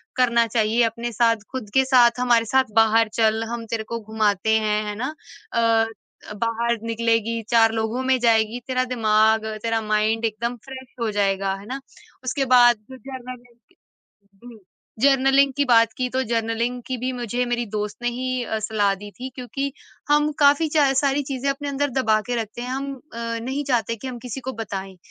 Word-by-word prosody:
करना 235 -2 +3
चाहिए, 225 0 +1
अपने 235 +1 -2
साथ 230 0 +3 0.2
ख़ुद 255 -6 -6
के 265 - +5
साथ, 245 -2 +4
हमारे 240 -2 +3
साथ 260 +1 +1
बाहर 225 0 +4
चल 220 0 +2
हम 235 -1 -5
तेरे 225 0 -3
को 230 +1 -5
घुमाते 220 0 +1
हैं, 215 0 0
है 210 0 -4
ना? 260 +8 -4 0.4
अ 230 -1 +3 0.5
अ, - - -5
बाहर 235 +1 0
निकलेगी, 230 0 0
4 225 -2 +5
लोगों 225 +3 -1
में 260 0 +3
जाएगी 225 0 +2
तेरा 255 -1 +1
दिमाग, 220 -1 +3 0.2
तेरा 225 -1 0
माइंड 215 +1 0
एकदम 230 +2 -2
फ़्रेश 265 -1 -10
हो 230 - 0
जाएगा, 195 -1 0
है 195 +1 -11
ना? 260 +5 -5 0.4
उसके 270 +2 -1
बाद 240 -1 +6
जो 260 - -9
जर्नलिंग 250 -2 -10
जी, 220 - -19 0.4
जर्नलिंग 270 0 +4
की 285 - +3
बात 230 -3 +4
की 255 - 0
तो 260 +1 -1
जर्नलिंग 230 +1 -1
की 260 - -2
भी 255 +2 -2
मुझे 245 0 -2
मेरी 240 0 -1
दोस्त 210 0 -4
ने 240 - +2
ही 255 +1 -2
अ, 220 -1 -3
सलाह 210 -2 +1
दी 205 +2 -10
थी, 255 +5 -7
क्योंकि 275 +2 -4 0.4
हम 295 +1 +3
काफ़ी 290 +2 +5
चा 290 -3 +3
सारी 275 +1 +1
चीज़ें 275 0 -3
अपने 285 +1 -3
अंदर 285 +1 -1
दबा 225 -4 +2
के 245 - -1
रखते 220 +2 -8
हैं, 245 - -5
हम 275 +2 -3 0.2
अ, 230 0 -4
नहीं 265 +5 -3
चाहते 230 -4 0
कि 245 +4 -8
हम 250 -2 -6
किसी 250 +1 -6
को 260 +1 -4
बताएँ। 195 -4 -6
235 Hz, 190 wpm, -23 LUFS, 220-255 Hz, 0.5 s, बाद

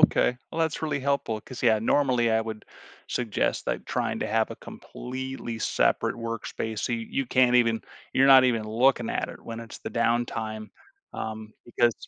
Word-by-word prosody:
okay. 125 - +4
Well, 165 - -3
that's 160 -1 0
really 150 -3 -1
helpful 135 -5 0
'cause, 130 +2 -10
yeah, 110 -3 +5
normally, 120 0 +2
I 110 0 +3
would 110 -1 -6 0.4
suggest, 120 -4 -1
like, - - -2
trying - - -1
to - - -1
have 110 +1 +1
a - - -6
completely 130 -2 -7
separate - - +1
workspace 115 -1 -4
so 125 - -1
you 115 -1 -2
you 135 -2 -1
can't 125 0 +4
even 115 -2 +3 0.3
you're 135 +1 +5
not 135 -1 +9
even 115 -3 +2
looking 120 +2 +2
at - - -1
it - - -10
when 115 0 -6
it's 115 - -9
the - - -6
downtime, 115 -2 -1 0.4
um, 110 0 -6
because 120 -1 +2
115 Hz, 180 wpm, -27 LUFS, 110-130 Hz, 0.4 s, not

